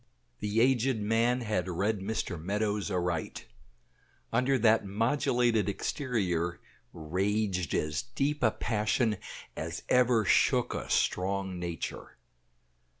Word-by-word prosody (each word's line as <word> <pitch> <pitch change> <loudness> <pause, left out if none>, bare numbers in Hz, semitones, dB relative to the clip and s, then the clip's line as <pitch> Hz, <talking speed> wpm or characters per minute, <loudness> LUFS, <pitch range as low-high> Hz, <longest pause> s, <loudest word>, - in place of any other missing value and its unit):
The 105 +2 +1
aged 130 0 +3
man 115 +4 +1
had 105 -5 -1
read 100 +4 0
Mr. 95 -4 -3
Meadows 105 +2 -1
aright; 90 -3 -2 0.9
under 125 +3 +3
that 110 -1 +4
modulated 115 0 +1
exterior 95 - -1 0.3
raged 95 +2 -1
as 75 -1 0
deep 140 - -2
a 115 - +5
passion 110 0 0 0.4
as 80 +1 -5
ever 125 -3 +4
shook - - +3
a - - -5
strong 95 0 0
nature. 85 -1 -5
105 Hz, 105 wpm, -30 LUFS, 90-115 Hz, 0.9 s, a